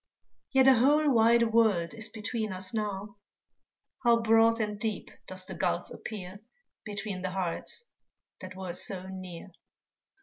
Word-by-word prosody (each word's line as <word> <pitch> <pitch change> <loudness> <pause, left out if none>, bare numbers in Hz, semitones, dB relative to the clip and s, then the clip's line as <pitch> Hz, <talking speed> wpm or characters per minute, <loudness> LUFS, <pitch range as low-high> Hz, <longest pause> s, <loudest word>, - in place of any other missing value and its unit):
Yet 265 -1 +5
a 265 - +9
whole 290 +5 +4
wide 230 -1 +4
world 205 -8 +3
is 225 0 -3
between 220 0 -3
us 185 +2 -5
now; 205 -1 -3 0.9
How 235 -1 +5
broad 225 0 +4
and 210 -2 -2
deep 220 -1 -3 0.2
does - - -6
the - - -6
gulf - - -1
appear 195 -3 -7 0.4
Between 205 -3 -5
the 185 - -2
hearts 190 - -3 0.5
that 185 0 -9
were 185 -2 -5
so 185 +1 -1
near! 185 -1 -8
215 Hz, 140 wpm, -29 LUFS, 190-230 Hz, 0.9 s, a